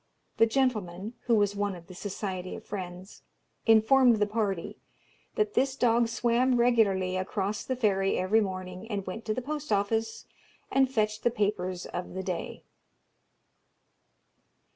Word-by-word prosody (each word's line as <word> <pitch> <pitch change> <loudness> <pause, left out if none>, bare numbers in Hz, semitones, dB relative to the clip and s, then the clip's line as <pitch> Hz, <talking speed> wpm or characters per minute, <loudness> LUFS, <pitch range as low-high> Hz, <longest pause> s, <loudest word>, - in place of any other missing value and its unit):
The 225 - +5
gentleman 220 -5 -1
(who 235 - +5
was 205 -1 +2
one 205 -1 -1
of 170 -1 -12
the 185 - -12
Society 185 -1 -5
of - - -10
Friends) 185 -1 -7 0.5
informed 230 +3 +6
the 210 -1 +2
party, 205 -4 -2 0.6
that 425 -2 0
this 265 0 +1
dog 235 -2 +3
swam 240 +2 +2
regularly 205 -6 +3
across 195 +2 -2
the 260 - -2
ferry 195 -5 +1
every 195 +5 +3
morning, 185 +1 -5
and 200 -3 -3
went 205 +5 -6
to 215 - 0
the 255 - -3
post 300 -1 -5
office, 220 +2 0 0.5
and 265 -1 +3
fetched 215 -3 0
the - - +3
papers 200 -5 -1
of 180 +1 -6
the 190 - -3
day. 180 -2 -4
210 Hz, 145 wpm, -28 LUFS, 190-235 Hz, 0.6 s, informed